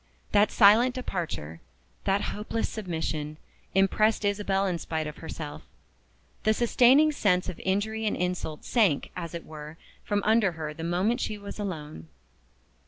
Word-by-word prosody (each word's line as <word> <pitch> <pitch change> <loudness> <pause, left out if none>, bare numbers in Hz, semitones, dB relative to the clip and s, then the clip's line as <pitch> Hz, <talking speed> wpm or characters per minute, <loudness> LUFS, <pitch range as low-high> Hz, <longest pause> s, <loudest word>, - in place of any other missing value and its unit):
That 205 +1 +4
silent 230 +4 +6
departure, 165 - -4 0.4
that 195 +1 +2
hopeless 215 +2 -2
submission, 160 -6 -4 0.4
impressed 210 +3 +3
Isabel 200 -1 +1
in 180 -3 -1
spite 160 -1 -3
of 150 0 -7
herself. 160 -2 -7 0.8
The 215 0 +2
sustaining 255 +6 +5
sense 185 -10 +1
of 175 - -6
injury 215 +3 0
and - - 0
insult 180 -4 -3
sank, 200 - +2
as 170 -2 -5
it 170 - -6
were, 155 0 -9 0.3
from 205 -1 -1
under 215 -4 +3
her 155 -1 -5
the 160 - -8
moment 190 +9 +1
she 215 - -2
was 200 +1 -9
alone. 155 - -5
195 Hz, 145 wpm, -27 LUFS, 160-215 Hz, 0.8 s, silent